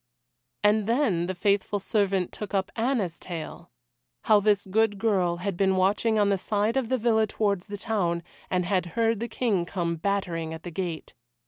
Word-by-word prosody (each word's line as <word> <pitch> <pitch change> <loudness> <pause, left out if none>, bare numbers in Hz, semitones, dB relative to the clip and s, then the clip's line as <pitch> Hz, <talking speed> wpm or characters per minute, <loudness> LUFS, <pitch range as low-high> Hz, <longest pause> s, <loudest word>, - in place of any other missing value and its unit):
And 210 0 +3
then 225 - +1
the 185 - -3
faithful 200 +2 +1
servant 195 -2 0
took 210 -1 -6
up 190 -1 0
Anna's 225 -8 -1
tale. 170 -3 -7 0.5
How 215 -1 +5
this 205 -1 +2
good 205 +1 +1
girl 190 -5 +1
had 190 +1 -3
been 190 +1 +2
watching 205 +4 +2
on 205 -1 +3
the 195 -1 +1
side 210 +4 0
of 260 -4 0
the 260 - +2
villa 220 -2 +2
towards 200 -3 -1
the 205 0 -5
town, 175 -6 -1 0.3
and 180 -1 0
had 180 -1 0
heard 225 -2 +2
the 235 - -3
King 220 -6 0
come 170 -1 -2
battering 170 -3 -2
at 160 - -11
the 175 - -6
gate. 170 -2 -4
200 Hz, 185 wpm, -26 LUFS, 180-220 Hz, 0.5 s, How